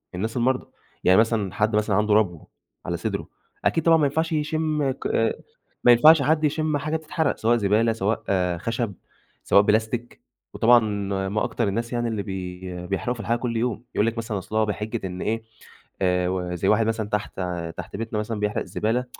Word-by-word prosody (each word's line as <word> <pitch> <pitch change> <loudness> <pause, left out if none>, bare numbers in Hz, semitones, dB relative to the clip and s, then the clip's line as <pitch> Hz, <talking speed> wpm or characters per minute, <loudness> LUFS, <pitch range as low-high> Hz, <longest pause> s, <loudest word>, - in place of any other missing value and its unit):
الناس 110 +6 -3
المرضى، 130 +2 +1 0.4
يعني 95 +3 +6
مثلًا، 110 -4 +1
حد 105 +3 +1
مثلًا 105 -1 +1
عنده 105 +1 +2
ربو 95 -7 +1 0.4
على - - -2
صدره، - - -3 0.4
أكيد، 165 - +2
طبعًا 165 0 +6
ما 155 - +3
ينفعش 160 +4 0
يشم 155 -2 0
ك 130 - -5 0.8
ما 120 - +7
ينفعش 150 +6 +7
حد 155 +3 +2
يشم 155 0 +1
حاجة 155 +2 -2
بتتحرق، 160 -1 -1
سواء 120 +2 +2
زبالة، 110 +2 +2
سواء 110 0 -1 0.3
خشب، 115 +3 -2 0.5
سواء 100 - +5
بلاستيك، 110 +3 -1 0.3
وطبعًا 120 +1 +6 0.5
ما 105 +2 0
أكتر 115 - -1
الناس 115 +4 -2
يعني 120 0 0
اللي 110 -3 -2
بي 90 -2 -6
بيحرقوا 100 +6 -1
في 120 - -12
الحاجة 115 +2 0
كل 120 -1 -2
يوم، 115 -1 -1
يقُول 105 - +2
لِك 115 0 -2
مثلًا 110 -2 -3
أصل 95 +3 -7
هو 110 0 +3
بحجة 105 0 -3
إن 90 0 -6
إيه 110 +1 -1 0.6
آآ 90 -1 +2
وزَي 90 -2 -2
واحد 110 +1 +4
مثلًا 110 -2 -1
تحت 105 -2 -3 0.4
تحت - - -7
بيتنا 110 0 -3
مثلًا 110 0 -3
بيحرق 105 0 -1
الزبالة 115 +4 -1
110 Hz, 180 wpm, -24 LUFS, 105-125 Hz, 0.8 s, ما